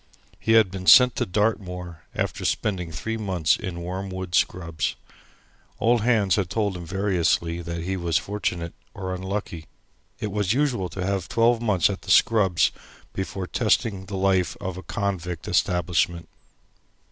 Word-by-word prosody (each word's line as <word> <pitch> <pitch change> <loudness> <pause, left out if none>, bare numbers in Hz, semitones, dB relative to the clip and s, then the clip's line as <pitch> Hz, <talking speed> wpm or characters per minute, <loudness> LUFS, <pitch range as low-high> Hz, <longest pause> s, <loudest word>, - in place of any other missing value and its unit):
He 115 - +1
had 110 -5 +5
been 95 -1 -6
sent 125 -2 +8
to 120 - 0
Dartmoor 90 -4 -2
after - - -2
spending 90 -6 -1
three 115 +8 -4
months 95 -7 +1
in 85 -4 -6
Wormwood 95 0 -5
Scrubbs. 85 -3 0 0.8
Old 120 0 +3
hands 110 -5 +3
had 95 -4 0
told 100 -1 -1
him 85 -2 -7
variously 85 -3 0
that 85 0 -5
he 95 +2 -2
was 85 -2 +1
fortunate 90 -5 -3 0.2
or 95 -1 -4
unlucky. 95 -3 -4 0.5
It 105 - -3
was 105 0 +1
usual 125 -9 0
to 90 +2 -4
have 95 -2 -2
twelve 115 0 +3
months 100 -7 +3
at 100 -1 -4
the 100 - -11
Scrubbs 95 -4 +4 0.4
before 95 0 -4
testing 105 -2 0
the 100 -1 -4
life 95 -4 +1
of 95 -1 -4
a 95 - -7
convict 90 -2 -3
establishment. 85 -1 +1
95 Hz, 150 wpm, -24 LUFS, 90-105 Hz, 0.8 s, sent